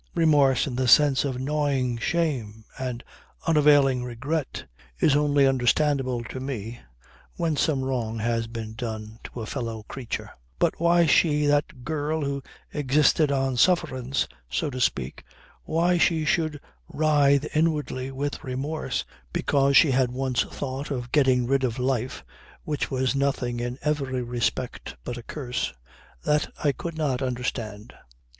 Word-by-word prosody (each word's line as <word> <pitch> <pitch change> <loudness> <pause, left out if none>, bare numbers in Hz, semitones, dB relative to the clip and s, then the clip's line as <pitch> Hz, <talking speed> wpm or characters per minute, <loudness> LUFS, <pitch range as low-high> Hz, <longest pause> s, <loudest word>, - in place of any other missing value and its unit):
Remorse 145 -6 +4
in 130 -4 -4
the 130 -1 +1
sense 145 +1 +6
of 130 -3 -2
gnawing 135 -3 0
shame 120 -9 -1
and 125 -2 -4 0.4
unavailing 145 -5 +4
regret 130 +5 -3 0.3
is 145 - +4
only 145 -1 +3
understandable 130 -1 +2
to 130 - -7
me 120 -3 -5 0.6
when 165 -3 0
some 140 -2 +1
wrong 120 -4 -2
had 115 0 -1
been 110 -2 -6
done 110 -1 -6
to 120 - -7
a - - -4
fellow 115 -3 -4
creature. 125 +2 -6 0.3
But - - +1
why 170 0 +4
she, 150 -1 +3
that 145 -3 +1
girl 155 0 -1
who 140 0 -2 0.3
existed 150 +1 +3
on 135 -2 0
sufferance, 135 -4 +2 0.2
so 140 - -1
to 130 0 -4
speak - - -1 0.4
why 170 +2 +2
she 160 -2 +2
should 155 -1 0 0.3
writhe 145 -1 +2
inwardly 150 -5 0
with 140 +2 -4
remorse 140 +5 -3 0.3
because 140 -1 +3
she 155 - +6
had 130 -1 +2
once 130 -1 0
thought 135 +1 -4
of 125 -4 -4
getting 130 -4 +3
rid 135 +2 +1
of 120 -2 -1
a 125 - -2
life 130 +1 -1 0.4
which 150 -2 -2
was 130 -1 0
nothing 135 -3 0
in 120 +1 -3
every 135 -4 -1
respect 120 - -3
but 120 - -5
a - - -6
curse 125 0 -3 0.5
that 150 0 +1
I 145 - +4
could 165 +4 -6
not 140 -5 0
understand. 120 -4 -4
135 Hz, 145 wpm, -25 LUFS, 125-150 Hz, 0.6 s, sense